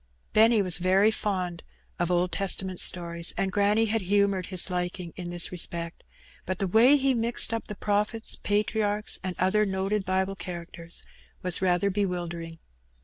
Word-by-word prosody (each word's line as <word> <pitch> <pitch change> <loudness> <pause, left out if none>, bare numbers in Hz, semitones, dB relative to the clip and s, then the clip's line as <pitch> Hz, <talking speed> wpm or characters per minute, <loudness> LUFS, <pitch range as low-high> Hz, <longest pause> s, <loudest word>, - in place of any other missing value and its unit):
Benny 220 -1 +5
was 180 -2 -1
very 190 +4 +3
fond 185 -6 -3 0.4
of 175 0 0
Old 180 0 +1
Testament 190 0 +1
stories, 170 -1 +2
and 190 - -1
granny 205 +3 +2
had 225 0 -1
humoured 195 -1 +1
his 185 0 +3
liking 180 -1 -4
in 175 -1 -7
this 175 -1 +1
respect, 170 -1 -2 0.4
but 185 0 -2
the 195 - -1
way 230 +9 +5
he 270 -1 +1
mixed 230 -1 +3
np 230 0 -3
the 210 - -7
prophets, 210 +3 -1
patriarchs, 210 0 -1
and 185 -1 -4
other 190 +4 +2
noted 195 +1 -1
Bible 190 +1 -1
characters, 170 -2 -5 0.4
was 180 0 0
rather 185 +2 +1
bewildering. 175 -4 -3
190 Hz, 155 wpm, -26 LUFS, 175-210 Hz, 0.4 s, Benny